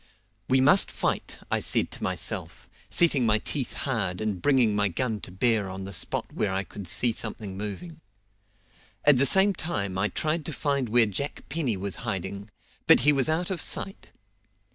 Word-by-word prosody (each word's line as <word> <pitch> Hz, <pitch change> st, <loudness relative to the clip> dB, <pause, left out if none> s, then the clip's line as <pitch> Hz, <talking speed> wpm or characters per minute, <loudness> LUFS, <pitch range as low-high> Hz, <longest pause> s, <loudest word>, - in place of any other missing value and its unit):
"We 130 Hz, 0 st, +3 dB
must 145 Hz, +9 st, +5 dB
fight," -, -, -3 dB
I -, -, +1 dB
said -, -, 0 dB
to -, -, -9 dB
myself, -, -, -3 dB, 0.2 s
setting 160 Hz, -7 st, +3 dB
my 110 Hz, -2 st, +3 dB
teeth 130 Hz, +4 st, -3 dB
hard 100 Hz, -9 st, -2 dB
and 105 Hz, -4 st, -3 dB
bringing 125 Hz, -7 st, +2 dB
my 105 Hz, 0 st, +2 dB
gun 110 Hz, +3 st, -3 dB
to -, -, -9 dB
bear 105 Hz, +1 st, +1 dB
on 95 Hz, +1 st, -7 dB
the 100 Hz, +1 st, -8 dB
spot 85 Hz, -, -2 dB
where 100 Hz, -, -1 dB
I 95 Hz, +1 st, -2 dB
could 95 Hz, 0 st, -10 dB
see 120 Hz, +8 st, +6 dB
something 110 Hz, -3 st, -4 dB
moving. 105 Hz, -, -7 dB, 1.0 s
At 145 Hz, -3 st, +6 dB
the 135 Hz, +2 st, +5 dB
same 195 Hz, +5 st, +4 dB
time 100 Hz, -, -4 dB
I 105 Hz, -, +1 dB
tried 155 Hz, -, -2 dB
to 160 Hz, -, -4 dB
find 140 Hz, -5 st, -2 dB
where 120 Hz, +1 st, +4 dB
Jack 110 Hz, +8 st, -5 dB
Penny 135 Hz, -10 st, -2 dB
was 100 Hz, 0 st, -4 dB
hiding, 100 Hz, +2 st, -5 dB, 0.4 s
but -, -, +7 dB
he 150 Hz, +4 st, +4 dB
was 135 Hz, +1 st, +1 dB
out 170 Hz, +4 st, -1 dB
of 175 Hz, -4 st, -2 dB
sight. 195 Hz, -, 0 dB
115 Hz, 185 wpm, -26 LUFS, 100-145 Hz, 1.0 s, but